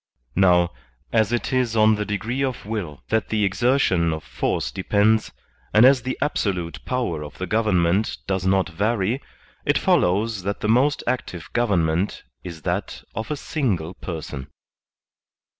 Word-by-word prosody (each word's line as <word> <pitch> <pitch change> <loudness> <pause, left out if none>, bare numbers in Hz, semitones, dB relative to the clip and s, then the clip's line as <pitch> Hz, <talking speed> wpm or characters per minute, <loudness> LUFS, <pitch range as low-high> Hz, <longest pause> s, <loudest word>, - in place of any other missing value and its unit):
Now, 90 -2 +4 0.4
as 110 -2 +3
it 120 +2 -1
is 125 -3 +1
on 110 0 +5
the 105 0 -1
degree 110 +7 -2
of 130 -5 -3
will 100 -10 -5
that 110 -2 0
the 105 -1 +1
exertion 100 -5 +2
of 80 - -5
force - - -2
de - - -5
pends, 105 +3 +2 0.4
and 110 +3 +8
as 130 -1 +6
the 130 +2 -3
absolute 95 - -2
power 120 -12 -1
of 75 - -10
the 95 - -3
government 100 -2 +2
56 - - -4
THE - - -23
SOCIAL - - -36
CONTRACT - - -41
does 95 -1 0 0.2
not - - -20
vary, 110 +3 +1 0.4
it - - +2
follows 105 +3 +2
that 100 +2 -3
the - - 0
most 135 +6 +3
active 105 -10 -3
govern 105 -9 +2
ment 85 +5 -1 0.2
is 85 -4 -8
that - - -3
of 110 +5 -4
a 150 - -1
single 100 - -2
person. 80 -7 -6
105 Hz, 175 wpm, -23 LUFS, 90-120 Hz, 0.4 s, and